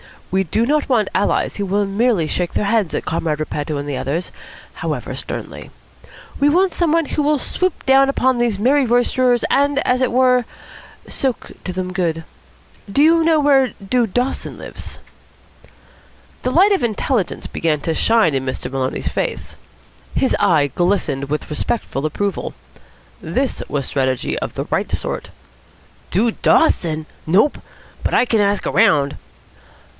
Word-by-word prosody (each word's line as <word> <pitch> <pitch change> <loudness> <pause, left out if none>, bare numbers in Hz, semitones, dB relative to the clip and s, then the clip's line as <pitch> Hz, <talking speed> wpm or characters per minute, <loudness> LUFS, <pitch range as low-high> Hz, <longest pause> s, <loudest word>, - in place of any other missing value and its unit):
We 190 +1 +2
do 220 +7 0
not 295 +2 +1
want 225 -6 +2
allies - - 0
who 200 - -2
will 200 +2 +1
merely 200 -2 +1
shake 175 +2 -2
their - - 0
heads 205 -5 +1
at - - -3
Comrade 160 -2 -1
Repetto 150 -1 -3
and 145 +1 -4
the 140 -2 -2
others, 160 +8 -3 0.4
however - - -4
sternly. - - -7 0.7
We 285 - +4
want 365 +4 +3
some 340 -3 +1
one 330 0 +2
who 300 - -2
will 295 +1 +2
swoop 365 +6 -2
down 270 0 +5
upon 260 -2 +2
these 240 -4 +1
merry 265 +6 +3
roisterers, 245 +1 +2
and, 285 0 +2
as 250 +1 +2
it 255 - +2
were, 250 0 +3 0.6
soak 260 -4 -2
to 185 - -3
them 185 0 -4
good. 165 -3 -1 0.7
Do 280 - +3
you 330 +1 +5
know 320 -1 +3
where 270 -3 +3
Dude 235 -3 +1
Dawson 250 +2 -2
lives?" - - -8 1.4
The - - -1
light 370 +10 +4
of 390 - +2
intelligence 230 -2 -1
began 155 -3 -1
to 165 - -1
shine 220 -3 +3
in 135 -1 -1
Master 130 -1 -4
Maloney's 130 0 -2
face. - - -3 0.6
His 265 - +2
eye 165 -8 +3
glistened 175 -7 0
with 150 +2 -4
respectful 150 -2 -2
approval. 200 +5 -3 0.7
This 265 0 -2
was 140 -2 -2
strategy 130 -2 -1
of - - -5
the - - -3
right - - 0
sort. - - -3 0.8
"Dude 220 +5 0
Dawson? 160 - +2 0.2
Nope. 205 - +3 0.4
But - - -2
I - - +5
can 225 -2 +1
ask 205 0 +1
around." 150 -11 +3
215 Hz, 155 wpm, -19 LUFS, 165-265 Hz, 1.4 s, down